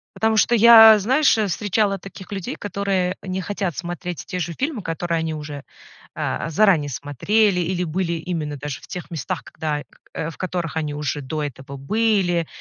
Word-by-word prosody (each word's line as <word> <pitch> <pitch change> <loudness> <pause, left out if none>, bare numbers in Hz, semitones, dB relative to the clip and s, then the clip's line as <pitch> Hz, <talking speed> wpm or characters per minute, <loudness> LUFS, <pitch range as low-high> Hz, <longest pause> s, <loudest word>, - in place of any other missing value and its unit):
Потому 220 0 +1
что 240 - +4
я, 225 -1 +9
знаешь, 260 +5 +3
э, 215 - +1
встречала 200 +1 0
таких 195 +1 -11
людей, 195 -3 -4
которые 195 -3 -1
не 185 0 -3
хотят 190 -2 -3
смотреть 175 0 -5
те 180 - -4
же 170 0 -3
фильмы, 270 - -3
которые 165 -1 -2
они 160 0 -2
уже, 150 -2 -7 0.5
э, 165 - -2
заранее 165 -4 +3
смотрели 180 - +1
или 180 +1 -1
были 170 +1 -1
именно 160 -3 -4
даже 140 0 -6
в - - -14
тех 180 -1 -7
местах, 165 -2 -4
когда 150 +1 -4
к - - -27 0.3
в - - -15
которых 175 -3 -3
они 150 -2 -2
уже 145 0 -3
до 150 +3 -4
этого 140 0 -7
были. 180 +1 +1
180 Hz, 175 wpm, -22 LUFS, 155-200 Hz, 0.5 s, я